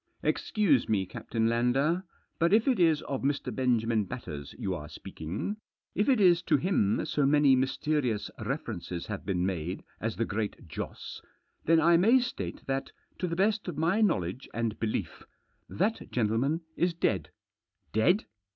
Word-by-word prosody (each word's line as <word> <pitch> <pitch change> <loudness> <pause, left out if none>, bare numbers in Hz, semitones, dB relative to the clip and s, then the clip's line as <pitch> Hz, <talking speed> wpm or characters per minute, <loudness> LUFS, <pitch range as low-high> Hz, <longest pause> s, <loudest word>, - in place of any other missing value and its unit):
"Excuse 175 - +2
me, 100 -3 +2
Captain 115 +4 -2
Lander, 135 +9 +2 0.4
but 170 +3 +3
if 220 +3 +4
it 255 -7 +3
is 160 -3 +4
of 135 -2 -3
Mr. 140 -2 -1
Benjamin 115 -3 +1
Batters 75 - -7
you 95 - -2
are 75 -4 -6
speaking, 95 - -5 0.4
if 205 - +1
it 255 -4 +4
is 175 -3 +5
to 155 -3 +2
him 135 - +1
so 150 -1 0
many 140 -1 +5
mysterious 130 -3 0
references 85 -2 -4
have 80 - -6
been 90 -2 0
made 90 0 -3 0.2
as 115 0 -2
the 115 - 0
Great 105 -4 -4
Joss, 75 - -6 0.4
then 165 0 +5
I 170 +1 +5
may 220 +9 +5
state 255 0 -3
that, 135 0 -2 0.3
to 180 - 0
the 170 - -2
best 205 +3 +1
of 170 -5 -4
my 170 +7 +2
knowledge 120 - 0
and 115 -2 -2
belief, 110 -1 -2 0.5
that 210 +6 -1
gentleman 125 +8 +1
is 175 -1 +1
dead." 95 - 0 0.6
"Dead? 175 - +3
135 Hz, 160 wpm, -29 LUFS, 110-170 Hz, 0.6 s, is